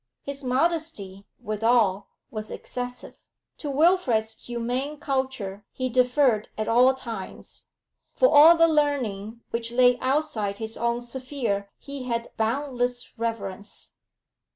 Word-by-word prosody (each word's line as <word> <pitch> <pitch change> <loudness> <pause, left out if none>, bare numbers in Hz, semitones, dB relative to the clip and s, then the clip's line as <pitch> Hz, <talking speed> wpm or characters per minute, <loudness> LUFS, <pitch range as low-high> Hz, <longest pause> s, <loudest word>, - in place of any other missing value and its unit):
His 280 0 -6
modesty, 255 - -1 0.2
withal, 215 -2 +2 0.2
was 215 -1 -6
excessive; 245 0 -6 0.4
to 295 - -4
Wilfrid's 275 -8 +2
humane 245 +5 -3
culture 260 -9 -3
he 255 0 -2
deferred 250 -2 +2
at 215 - -2
all 250 +3 +5
times; 230 -7 -8 0.5
for - - +5
all 320 -2 +8
the 330 0 +6
learning 240 -8 0
which 230 0 -3
lay 245 0 +4
outside 255 -7 -1
his 220 0 -5
own 235 0 -1
sphere 240 -5 -3
he 280 -2 -8
had 235 -1 -3
boundless 245 +1 -1
reverence. 210 -3 -5
245 Hz, 115 wpm, -25 LUFS, 220-275 Hz, 0.5 s, all